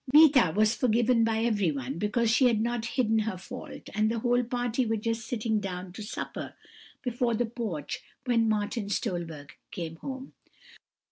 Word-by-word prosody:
"Meeta 285 - +7
was 215 +1 +4
forgiven 235 -1 +3
by 225 0 +1
everyone, 165 - 0
because 220 +2 +1
she 250 +3 +5
had 230 -3 +2
not 235 0 -1
hidden 225 -3 +3
her 215 -3 -2
fault; 250 +7 -9
and 215 +1 +2
the 230 - -1
whole 245 +2 +2
party 245 0 0
were 225 -1 0
just 225 +1 -2
sitting 220 -2 0
down 185 -2 -5
to 215 - -8
supper 210 - -5 0.5
before 245 -2 0
the 240 +2 +1
porch 225 - -4 0.3
when 230 -3 +3
Martin 210 0 -1
Stolberg 170 - -3 0.2
came 165 -2 -5
home. 265 +6 -7
225 Hz, 160 wpm, -28 LUFS, 205-240 Hz, 0.5 s, Meeta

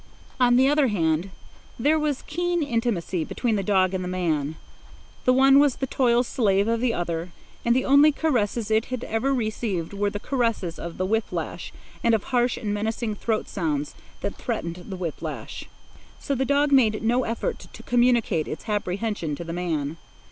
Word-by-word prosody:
On 245 -1 +5
the 260 +2 +5
other 295 -1 +3
hand, 170 -3 0 0.5
there 300 +6 +3
was 295 -3 -1
keen 350 +1 -1
intimacy 230 - -1
between 230 +6 -1
the 200 - 0
dog 190 -2 +2
and 185 -1 -2
the - - -4
man. 160 -5 -1 0.7
The 255 - +5
one 270 +2 +6
was 285 -3 +4
the 270 - -2
toil 245 -2 +2
slave 205 -5 +1
of 230 0 +1
the 250 -1 +2
other, 170 -3 -3 0.3
and 235 0 +3
the 260 - +1
only 285 +3 +6
caresses 235 -7 0
it 220 +1 +3
had 255 -1 -5
ever 225 +5 0
received 215 -8 -2
were 205 0 0
the 205 - -5
caresses 230 -9 -1
of 170 0 -6
the 185 - 0
whip 225 +3 0
lash - - -4 0.3
and 230 -1 +4
of 215 - -2
harsh 245 -1 +1
and 205 -2 -3
menacing 220 +1 -2
throat 215 +1 -2
sounds 150 -6 -2 0.3
that - - -4
threatened 170 +1 -4
the 190 - -5
whip 170 -4 -4
lash. - - -6 0.5
So 280 - -2
the 265 0 0
dog 285 +2 +2
made 225 -6 +4
no 240 +3 +2
effort 235 - -3
to - - -12
communicate 240 -9 +2
its 160 - -7
apprehension 205 -5 -2
to 170 - -6
the 165 0 -6
man. 165 -4 -2
220 Hz, 185 wpm, -25 LUFS, 185-255 Hz, 0.7 s, one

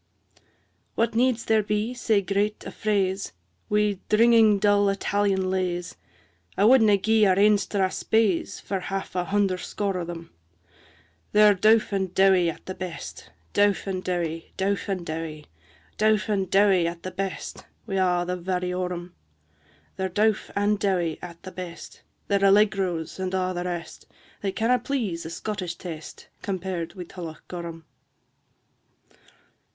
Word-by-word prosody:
III. - - -29 0.5
What 230 0 +1
needs 240 0 +2
there 220 -1 +3
be 210 +3 -1
sae 220 -4 +1
great 205 +2 -1
a - - -6
fraise 195 -2 -1 0.4
Wi' 210 -2 +1
dringing 225 -1 +5
dull 205 0 +3
Italian 195 -1 0
lays? 180 -2 -2 0.6
I 200 - +4
wadna 220 -4 +6
gie 220 +1 +3
our 185 -1 +3
ain 210 +1 +5
Strathspeys 200 0 0
For 195 - -3
half 195 0 -5
a 180 -1 0
hunder 195 -1 +1
score 195 -2 -2
o' - - -2
them; 170 -1 -8 1.0
They're 210 0 +7
dowf 215 +3 +3
and 190 -2 -1
dowie 190 -3 +5
at 165 - -8
the 185 - -5
best, 185 -3 -7 0.2
Dowf 205 0 +2
and 185 -2 -3
dowie, 165 -2 -3
dowf 200 +1 -1
and 185 -3 -2
dowie, 155 -1 -5 0.5
Dowf 215 0 +3
and 195 -3 0
dowie 195 -3 +4
at 170 0 -6
the 185 - -5
best, 190 +1 -5 0.2
Wi' 195 - -2
a' 180 -2 +2
their 180 +1 -2
variorum; 180 0 -3 0.9
They're 190 0 -1
dowf 210 +3 +1
and 205 0 +1
dowie 180 -6 0
at 170 -1 -10
the 185 - -8
best, 175 -2 -9 0.3
Their 200 -1 +2
allegros 195 -4 +2
and 190 0 -2
a' 185 0 0
the 175 0 -3
rest, 175 -2 -6 0.3
They 195 - -1
canna' 240 +5 +2
please 220 - -3
a - - -6
Scottish 180 0 -4
taste, 160 -3 -9
Compared 185 -3 -4
wi' 180 - -6
Tullochgorum. 170 -1 -8
190 Hz, 145 wpm, -25 LUFS, 180-210 Hz, 1.0 s, They're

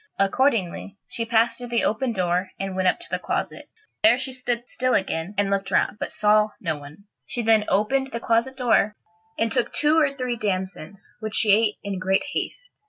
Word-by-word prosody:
Accordingly, 200 -3 0
she 230 - -4
passed 230 +1 +2
through 245 - -6
the 235 -1 0
open 235 +4 0
door 180 -2 0
and 195 -1 -3
went 185 0 +1
up 180 - +2
to 350 - -8
the - - -1
closet. - - -4 0.3
There 320 -6 +6
she 260 0 -4
stood 245 -2 -3
still 255 0 0
again, 190 0 -2
and 200 -1 +1
looked 195 0 -1
round, 210 - +1
but - - -4
saw 210 0 +3
no 165 -4 -2
one. 145 +6 -12 0.2
She 240 - -3
then 220 -1 +4
opened 265 +7 +1
the 235 -3 -5
closet 235 +3 0
door, 230 -5 +2 0.4
and 225 0 0
took 245 -2 0
two 305 +2 +3
or 295 -3 +3
three 250 -2 -2
damsons, 190 -2 -4
which 215 -1 -4
she 215 - +4
ate 210 0 +3
in 200 -2 -4
great 190 +1 +1
haste. - - -4
215 Hz, 200 wpm, -24 LUFS, 195-245 Hz, 0.4 s, There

